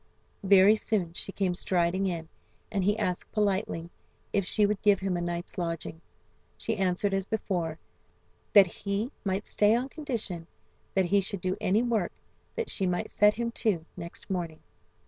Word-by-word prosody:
Very 195 +2 +7
soon 195 -6 -1
she 195 - -5
came 190 -2 0
striding 180 +1 +1
in, 165 -3 -3 0.4
and 200 -3 0
he 205 +3 +2
asked 180 -5 -2
politely 195 -5 0 0.4
if 200 -3 +2
she 210 - +3
would 205 -1 0
give 205 -2 +4
him 190 -1 -1
a 175 - -1
night's 175 +2 -4
lodging. 165 -1 -4 0.6
She 225 - -2
answered 195 0 +1
as 195 0 0
before, 175 -7 -2 0.8
that 200 -2 +9
he 200 +6 -3
might 195 0 -1
stay 210 +2 +3
on 250 +3 -1
condition 230 - -4 0.5
that 190 -1 +4
he 200 +3 +3
should 195 -1 -4
do 185 +1 0
any 210 +3 +3
work 225 -7 0 0.4
that 465 -1 -2
she 190 - 0
might 180 0 -1
set 210 0 +5
him 235 +1 -2
to 200 -9 0
next 170 -1 -8
morning. 170 -4 -3
195 Hz, 165 wpm, -29 LUFS, 175-210 Hz, 0.8 s, that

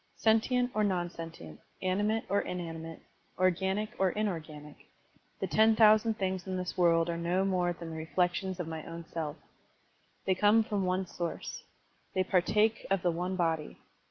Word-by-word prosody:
Sentient 245 +3 +2
or 215 - +1
non 180 -4 0
sentient, 160 - -9 0.2
animate 205 +4 +1
or 200 +1 +2
inani 170 -2 -5
mate, 165 0 -8 0.4
organic 190 +3 +1
or 190 -1 +4
inorganic, 160 -7 -5 0.5
the - - -1
ten 220 0 +4
thousand 220 0 +5
things 190 -2 -2
in 185 -1 -2
this 180 0 -4
world 165 -2 +4
are 170 0 -2
no 180 +3 +1
more 180 -2 +1
than 170 -1 -7
the 160 0 -5
reflec 175 +2 +1
tions 190 -1 -4
of 175 - -3
my 160 -1 -5
own 165 0 -8
self. 160 -2 -3 0.9
They 190 - +3
come 210 +4 +4
from 205 -2 -2
the 185 - 0
one 185 +1 0
source. 170 -2 -5 0.5
They 185 - +3
partake 210 +4 +2
of 195 -2 +1
the 175 - +3
one 180 +3 -2
body. 165 -4 -1
185 Hz, 175 wpm, -31 LUFS, 170-205 Hz, 0.9 s, thousand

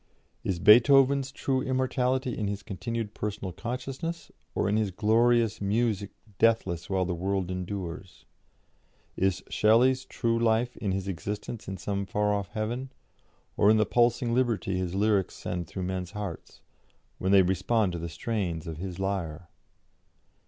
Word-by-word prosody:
Is 95 - -1
Beethoven's 135 +7 +6
true 135 -1 -1
immortality 130 0 0
in 105 - -2
his 100 0 -4
continued 110 +1 -4
personal 105 -3 -4
consciousness, 135 - -5 0.2
or - - +1
in 100 - +1
his 110 -2 +1
glorious 115 +2 +2
music 105 -1 0 0.3
deathless 95 -7 +2
while 95 -1 +1
the 90 - -2
world 95 +1 -1
endures? 90 -1 -6 0.9
Is 95 0 0
Shelley's 125 +5 +3
true 115 -1 -1
life 115 +1 +1
in 100 - -2
his 95 0 -2
existence 105 +4 -5
in 95 - -4
some 100 +2 -3
far 105 +1 +1
off 100 -2 -2
heaven, 120 +6 -4 0.6
or 100 - +4
in 110 - +6
the 110 - +3
pulsing 120 +2 +2
liberty 115 -6 +1
his 90 -1 -2
lyrics 100 -2 +1
send 90 -2 -4
through 95 - -5
men's 90 0 -4
hearts, 100 -5 -7 0.6
when 95 - 0
they 100 -1 +7
respond 95 +3 +1
to 85 - -4
the 85 +1 -5
strains 85 -2 -3
of 80 -2 -6
his 90 +1 -5
lyre? 90 -4 -3
105 Hz, 150 wpm, -28 LUFS, 95-115 Hz, 0.9 s, they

